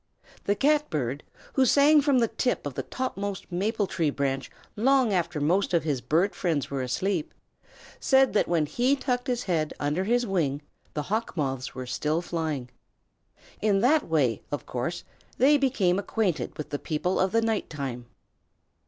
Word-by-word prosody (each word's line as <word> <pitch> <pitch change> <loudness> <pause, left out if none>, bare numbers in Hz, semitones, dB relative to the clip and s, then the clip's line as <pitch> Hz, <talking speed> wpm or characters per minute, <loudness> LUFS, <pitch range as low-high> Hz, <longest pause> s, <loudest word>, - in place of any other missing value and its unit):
The 205 - +2
Catbird, 160 - +1 0.3
who 265 - +4
sang 290 +4 +6
from 280 -2 +3
the 235 -2 +3
tip 250 - -1
of 145 - -3
the - - -3
topmost 200 -7 -4
maple 205 +4 0
tree 165 -4 0
branch 135 -1 -2 0.3
long 255 0 +3
after 170 -3 0
most 175 +5 +1
of 165 - +2
his 145 -5 -1
bird 175 +9 +1
friends 160 -8 -1
were 135 -1 -1
asleep, 160 +7 -1 0.7
said 265 0 +4
that 210 - +2
when 165 -3 +2
he 245 - +1
tucked 250 -2 -2
his 245 -1 -1
head 160 -5 -1
under 150 +6 0
his 245 +3 +2
wing 150 -8 -1 0.3
the 150 - -1
Hawk 215 +3 -2
Moths 135 -3 -2
were 130 - -5
still 150 +5 -1
flying. 155 -8 -3 0.9
In 205 -2 +2
that 295 +6 +3
way, 140 -8 +1
of 145 - -3
course, 165 +8 -3 0.3
they 275 +4 +5
became 230 -10 +2
acquainted 185 - -1
with 150 - -6
the 145 - -2
people 175 +3 -1
of 190 0 +2
the 230 - +3
night 225 -2 -1
time. 130 -5 -5
180 Hz, 170 wpm, -27 LUFS, 150-230 Hz, 0.9 s, sang